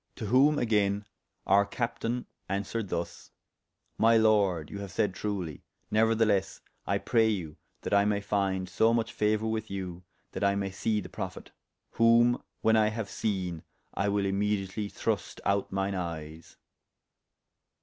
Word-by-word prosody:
To 115 Hz, -, -5 dB
whom 135 Hz, +7 st, +5 dB
agayne 105 Hz, -4 st, +1 dB, 0.4 s
our 100 Hz, +1 st, +5 dB
captayne 120 Hz, +2 st, -3 dB, 0.2 s
aunswered 100 Hz, +2 st, -2 dB
thus: 85 Hz, 0 st, -4 dB, 0.7 s
My 115 Hz, +1 st, +6 dB
Lord, 100 Hz, -8 st, +2 dB
you 100 Hz, -, -6 dB
have 100 Hz, -1 st, -6 dB
sayde 95 Hz, +1 st, 0 dB
truly; 95 Hz, -8 st, -4 dB, 0.3 s
neuertheless 110 Hz, -3 st, +2 dB, 0.3 s
I -, -, +2 dB
pray 115 Hz, -1 st, +2 dB
you 85 Hz, -8 st, -3 dB, 0.2 s
that -, -, -3 dB
I 100 Hz, 0 st, +5 dB
may 105 Hz, -1 st, +1 dB
fynd 95 Hz, -2 st, -1 dB
so 110 Hz, +5 st, +3 dB
much 115 Hz, +1 st, -1 dB
fauour 110 Hz, +1 st, +1 dB
with 110 Hz, 0 st, -3 dB
you, 90 Hz, -3 st, -5 dB, 0.3 s
that -, -, -4 dB
I 100 Hz, 0 st, +3 dB
may 100 Hz, -1 st, -2 dB
see 105 Hz, +2 st, -1 dB
the -, -, -9 dB
Prophet; -, -, -7 dB, 0.4 s
whom 115 Hz, +1 st, +4 dB, 0.2 s
when 110 Hz, 0 st, +4 dB
I 110 Hz, -1 st, +4 dB
haue 110 Hz, +1 st, -3 dB
seene, 95 Hz, -5 st, -3 dB, 0.3 s
I 100 Hz, +2 st, 0 dB
will 100 Hz, 0 st, +1 dB
immediately 100 Hz, +1 st, -1 dB
thrust -, -, -3 dB
out 100 Hz, 0 st, +1 dB
myne 95 Hz, +1 st, -1 dB
eyes. 80 Hz, -3 st, -6 dB
100 Hz, 150 wpm, -29 LUFS, 95-110 Hz, 0.7 s, My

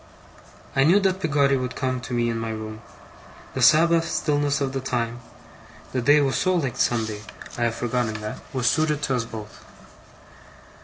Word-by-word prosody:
I 135 Hz, -, +4 dB
knew 175 Hz, +8 st, +5 dB
that 190 Hz, -1 st, +1 dB
Peggotty 140 Hz, -5 st, +2 dB
would 125 Hz, -1 st, -3 dB
come 130 Hz, -2 st, -2 dB
to 125 Hz, -, -7 dB
me 120 Hz, 0 st, +1 dB
in 115 Hz, -, -3 dB
my 115 Hz, 0 st, -3 dB
room. 110 Hz, 0 st, -6 dB, 0.7 s
The -, -, -3 dB
Sabbath 165 Hz, +1 st, +5 dB
stillness 145 Hz, -2 st, 0 dB
of 135 Hz, -2 st, -2 dB
the 135 Hz, -, -2 dB
time 120 Hz, -2 st, -2 dB, 0.7 s
(the 130 Hz, -, -1 dB
day 145 Hz, +5 st, +5 dB
was 135 Hz, -2 st, +1 dB
so 185 Hz, 0 st, +2 dB
like 140 Hz, -8 st, -1 dB
Sunday! 110 Hz, -3 st, 0 dB, 0.3 s
I 120 Hz, -, 0 dB
have 115 Hz, -1 st, -1 dB
forgotten 120 Hz, -2 st, -1 dB
that) 105 Hz, 0 st, -6 dB
was 130 Hz, -2 st, -2 dB
suited 150 Hz, +2 st, +2 dB
to 135 Hz, -2 st, +1 dB
us 120 Hz, -2 st, -1 dB
both. 110 Hz, -3 st, -9 dB
130 Hz, 175 wpm, -24 LUFS, 115-145 Hz, 0.7 s, knew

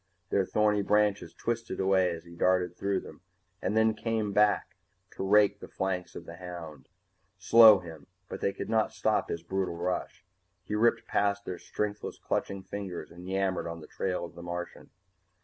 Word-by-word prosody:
Their 95 Hz, -2 st, +2 dB
thorny 105 Hz, -1 st, +2 dB
branches 105 Hz, -4 st, +2 dB
twisted 115 Hz, 0 st, -3 dB
away 95 Hz, -1 st, +3 dB
as 85 Hz, -2 st, -5 dB
he 85 Hz, -, -13 dB
darted 90 Hz, 0 st, +2 dB
through 100 Hz, +1 st, -3 dB, 0.4 s
and 105 Hz, +4 st, 0 dB
then 110 Hz, 0 st, +4 dB
came 110 Hz, -2 st, -2 dB
back 105 Hz, 0 st, +2 dB, 0.4 s
to -, -, -8 dB
rake 100 Hz, +1 st, +4 dB
the -, -, -9 dB
flanks 95 Hz, -1 st, -3 dB
of -, -, -8 dB
the 85 Hz, -, -10 dB
hound, 85 Hz, -5 st, -9 dB, 0.5 s
slow 110 Hz, -3 st, +8 dB
him 80 Hz, -5 st, -10 dB, 0.2 s
but -, -, -7 dB
they 100 Hz, -, +1 dB
could -, -, -6 dB
not 110 Hz, 0 st, +1 dB
stop 110 Hz, -1 st, 0 dB
his 85 Hz, -, -4 dB
brutal 95 Hz, -2 st, -2 dB
rush. 90 Hz, +1 st, -3 dB, 0.4 s
He -, -, -6 dB
ripped 115 Hz, +2 st, +2 dB
past 100 Hz, 0 st, 0 dB
their 90 Hz, -, -5 dB
strengthless 105 Hz, 0 st, -4 dB
clutching 100 Hz, -1 st, -3 dB
fingers 95 Hz, -4 st, -6 dB
and 90 Hz, +2 st, -10 dB
yammered 95 Hz, -2 st, 0 dB
on 85 Hz, 0 st, -5 dB
the 80 Hz, -, -10 dB
trail 90 Hz, +1 st, -3 dB
of 85 Hz, -, -12 dB
the 85 Hz, -, -10 dB
Martian. 90 Hz, 0 st, -6 dB
95 Hz, 175 wpm, -29 LUFS, 90-105 Hz, 0.5 s, slow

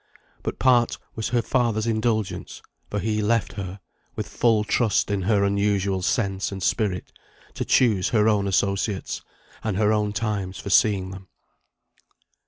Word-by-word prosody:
But -, -, -4 dB
part 120 Hz, -3 st, +3 dB, 0.2 s
was 110 Hz, -1 st, -3 dB
her 120 Hz, -1 st, +1 dB
father's 115 Hz, -4 st, +1 dB
indulgence, 110 Hz, -2 st, -1 dB, 0.3 s
for 105 Hz, -, -3 dB
he 105 Hz, +2 st, 0 dB
left 115 Hz, +1 st, +1 dB
her, 95 Hz, -1 st, -6 dB, 0.4 s
with -, -, -4 dB
full 115 Hz, -3 st, +2 dB
trust 105 Hz, -1 st, +1 dB
in 100 Hz, -1 st, 0 dB
her 100 Hz, +1 st, +2 dB
unusual 100 Hz, -1 st, +1 dB
sense 95 Hz, 0 st, 0 dB
and 95 Hz, -2 st, -5 dB
spirit, 95 Hz, -5 st, -1 dB, 0.4 s
to -, -, -3 dB
choose 105 Hz, -7 st, +3 dB
her 110 Hz, -2 st, +3 dB
own 105 Hz, -2 st, +2 dB
associates, 100 Hz, +1 st, -1 dB, 0.4 s
and 110 Hz, -4 st, -1 dB
her 105 Hz, 0 st, +3 dB
own 105 Hz, -1 st, +1 dB
times 105 Hz, -3 st, -2 dB
for 100 Hz, -, -6 dB
seeing 95 Hz, -3 st, +3 dB
them. 95 Hz, 0 st, -10 dB
105 Hz, 150 wpm, -24 LUFS, 100-110 Hz, 0.4 s, part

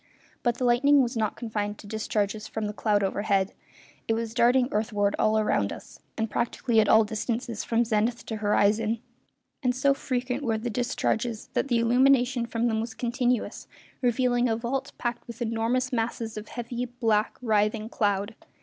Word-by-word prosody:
But 240 Hz, -1 st, 0 dB
the 255 Hz, -, -3 dB
lightning 275 Hz, +4 st, +5 dB
was 240 Hz, +1 st, -3 dB
not 220 Hz, -2 st, 0 dB
confined 210 Hz, -3 st, -3 dB
to -, -, -13 dB
discharges 215 Hz, 0 st, -2 dB
from 220 Hz, -1 st, -4 dB
the 210 Hz, -, -3 dB
cloud 205 Hz, -1 st, +1 dB
overhead, 195 Hz, 0 st, 0 dB, 0.5 s
it 225 Hz, -, +2 dB
was 225 Hz, 0 st, -3 dB
darting 245 Hz, +1 st, +4 dB
earthward 210 Hz, -1 st, 0 dB
all 220 Hz, 0 st, +3 dB
round 100 Hz, -, +1 dB
us, -, -, -10 dB, 0.2 s
and 220 Hz, -, 0 dB
practically 235 Hz, +1 st, 0 dB
at 215 Hz, -, +3 dB
all 220 Hz, 0 st, +7 dB
distances 225 Hz, +1 st, -3 dB
from 235 Hz, +1 st, +1 dB
zenith 230 Hz, +2 st, 0 dB
to 220 Hz, -, -4 dB
horizon; 215 Hz, +2 st, +2 dB, 0.6 s
and 250 Hz, -2 st, +1 dB
so 275 Hz, +2 st, +3 dB
frequent 255 Hz, 0 st, -2 dB
were 230 Hz, -5 st, 0 dB
the 230 Hz, +2 st, -3 dB
discharges 235 Hz, -1 st, -1 dB
that -, -, 0 dB
the 240 Hz, -3 st, +2 dB
illumination 245 Hz, +1 st, +3 dB
from 230 Hz, 0 st, 0 dB
them 220 Hz, -1 st, 0 dB
was 225 Hz, 0 st, -5 dB
continuous, 245 Hz, 0 st, -1 dB, 0.3 s
revealing 245 Hz, 0 st, +2 dB
a 225 Hz, -, +2 dB
vault 265 Hz, +4 st, -3 dB
packed 240 Hz, -1 st, -3 dB
with 235 Hz, 0 st, -9 dB
enormous 240 Hz, +3 st, 0 dB
masses 230 Hz, -1 st, -2 dB
of 215 Hz, 0 st, -7 dB
heavy, 240 Hz, +1 st, -4 dB
black, 225 Hz, -3 st, 0 dB
writhing 215 Hz, -2 st, +1 dB
cloud. 205 Hz, -1 st, 0 dB
230 Hz, 170 wpm, -27 LUFS, 215-245 Hz, 0.6 s, all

